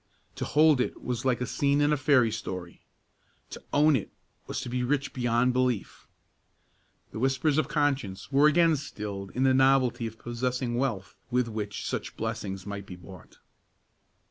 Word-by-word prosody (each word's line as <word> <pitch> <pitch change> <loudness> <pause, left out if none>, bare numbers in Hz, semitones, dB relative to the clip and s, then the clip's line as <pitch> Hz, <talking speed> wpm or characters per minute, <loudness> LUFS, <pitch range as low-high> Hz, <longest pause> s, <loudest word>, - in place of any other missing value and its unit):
To - - -4
hold 150 -3 +4
it - - -3
was 125 +1 -3
like 125 -2 +1
a - - 0
scene 140 +3 +1
in 145 +1 +3
a - - +4
fairy 130 -5 +3
story; 90 -5 -6 0.7
to - - -8
own 150 +1 +4
it 110 - -2 0.4
was - - -3
to - - -6
be 125 +1 -2
rich 140 +2 -1
beyond 120 0 +1
belief. 125 -4 -1 1.0
The - - -6
whispers 135 +4 +2
of 155 - 0
conscience 135 - -1
were 140 +2 +5
again 165 +1 +4
stilled 105 -8 -6
in 130 - +1
the 130 -1 +4
novelty 130 -3 +3
of 110 0 -10
possessing 125 +1 -2
wealth 120 -6 -2 0.2
with 125 -1 +1
which 105 -2 -5
such - - -4
blessings 105 -4 -4
might 100 -1 -6
be 90 - -8
bought. 90 0 -14
125 Hz, 170 wpm, -28 LUFS, 110-135 Hz, 1.0 s, were